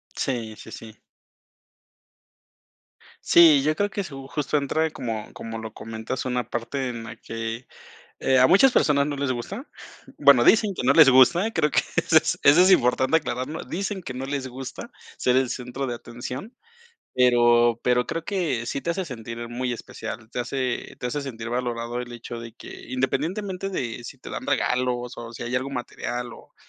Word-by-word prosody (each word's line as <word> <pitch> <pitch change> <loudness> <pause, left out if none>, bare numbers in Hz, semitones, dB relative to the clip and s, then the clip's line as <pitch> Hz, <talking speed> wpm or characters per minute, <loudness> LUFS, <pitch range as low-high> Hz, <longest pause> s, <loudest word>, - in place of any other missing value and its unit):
Sí, 115 -5 -3
sí, 110 - -12
sí. 110 -1 -11 2.2
Sí, 160 -5 +7
yo 155 +3 +1
creo 205 +4 0
que 200 0 -2
su 135 -6 -9
justo 150 +1 -1
entra 155 +3 0
como 115 -7 -5
como 115 0 -6
lo 110 -1 -7
comentas, 110 +4 -5
una 125 -1 -1
parte 130 +3 -3
en 115 -2 -6
la 115 0 -8
que, 115 +2 -6 0.5
eh, 130 - +3
a 130 - +7
muchas 200 - +6
personas 140 -9 +3
no 145 - -2
les 140 -1 -1
gusta. 195 - -5 0.5
Bueno, 140 -4 +7
dicen 210 - +4
que - - -4
no - - +4
les 155 -4 +8
gusta, 170 - +5
creo 155 -7 +1
que - - +3 0.2
eso - - +4 0.3
eso 145 +5 +7
es 185 - +6
importante 130 -2 +4
aclararlo, 145 +1 -4
dicen 195 +1 -4
que 130 - -6
no 130 +1 -5
les 140 -2 -3
gusta 130 +1 -8 0.3
ser 125 0 +2
el 130 -1 +2
centro 125 +2 -4
de 120 - -3
atención, 125 - -8 0.6
pero 120 -2 +4
pero 125 0 +2
creo 165 0 -4
que 165 - -1
sí 135 - -3
te - - -7
hace 185 +3 -1
sentir 120 -4 -7
muy 125 +1 -2
especial, 110 -1 -8
te 125 - -3
hace 125 0 -3
te - - -3
hace 145 +4 -2
sentir 120 -4 -6
valorado 120 -1 -2
el 125 0 -7
hecho 120 0 -7
de 115 -1 -9
que, - - -11
independientemente 180 - -2
de 120 -10 -4
si - - -9
te - - -11
dan - - -5
regalos 125 -1 0
o 115 0 -7
si - - -7
hay 120 +1 -4
algo 130 +2 -2
material, 120 -2 -5
o - - -15
130 Hz, 180 wpm, -24 LUFS, 120-150 Hz, 2.2 s, les